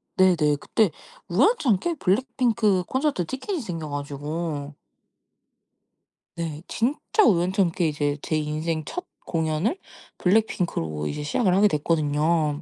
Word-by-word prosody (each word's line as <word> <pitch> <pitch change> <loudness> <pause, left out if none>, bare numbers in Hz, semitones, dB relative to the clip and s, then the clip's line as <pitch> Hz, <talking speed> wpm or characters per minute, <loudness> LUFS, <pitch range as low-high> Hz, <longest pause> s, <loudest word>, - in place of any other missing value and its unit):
네네. 170 -6 +4
그때 215 -5 +2 0.4
우연찮게 275 - +2
블랙핑크 225 -3 +1
콘서트 265 - 0
티켓이 285 - -4
생겨 165 -7 -5
가지고 145 +1 -4 1.6
네. 160 -3 -4
진짜 295 - +1
우연찮게 180 - +2
이제 145 -1 -1
제 155 - -2
인생 155 +1 -2
첫 360 - -5 0.2
공연을 160 - 0 0.4
블랙핑크로 175 - 0
이제 75 - -4
시작을 180 +6 +1
하게 205 +2 +6
됐거든요. 150 -1 +1
170 Hz, 260 characters per minute, -25 LUFS, 150-220 Hz, 1.6 s, 하게